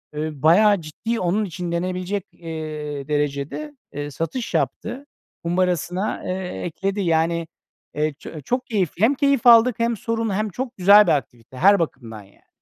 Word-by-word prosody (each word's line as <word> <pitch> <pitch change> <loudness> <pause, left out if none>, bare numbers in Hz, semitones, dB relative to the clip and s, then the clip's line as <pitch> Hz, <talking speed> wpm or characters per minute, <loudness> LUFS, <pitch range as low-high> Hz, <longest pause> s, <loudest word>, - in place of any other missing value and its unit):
ııı, 150 -2 -4
bayağı 200 +4 +5
ciddi 225 +10 -4
onun 190 +4 0
için 175 -1 -5
denebilecek, 185 +3 -2
eee, 155 -4 -6
derecede, 145 - -2 0.2
eee, 145 +1 -5
satış 195 - -4
yaptı. 255 +5 -2 0.4
Kumbarasına, 180 +2 -1
eee, 185 0 -4
ekledi. 195 +4 -2
Yani, 165 -1 +1 0.5
eee, 150 0 0
ço 155 - -9
çok 250 - -2
keyifli. 190 - -1
Hem 270 +5 +4
keyif 275 -3 +2
aldık 235 0 +7
hem 230 0 +1
sorum 230 0 -2
hem 215 +2 -1
çok 250 +5 -5
güzel 200 +3 +7
bir - - +4
aktivite 120 -3 -3
her 200 +6 +5
bakımdan 115 -9 -4
yani. 100 - -25
180 Hz, 150 wpm, -22 LUFS, 155-215 Hz, 0.5 s, aldık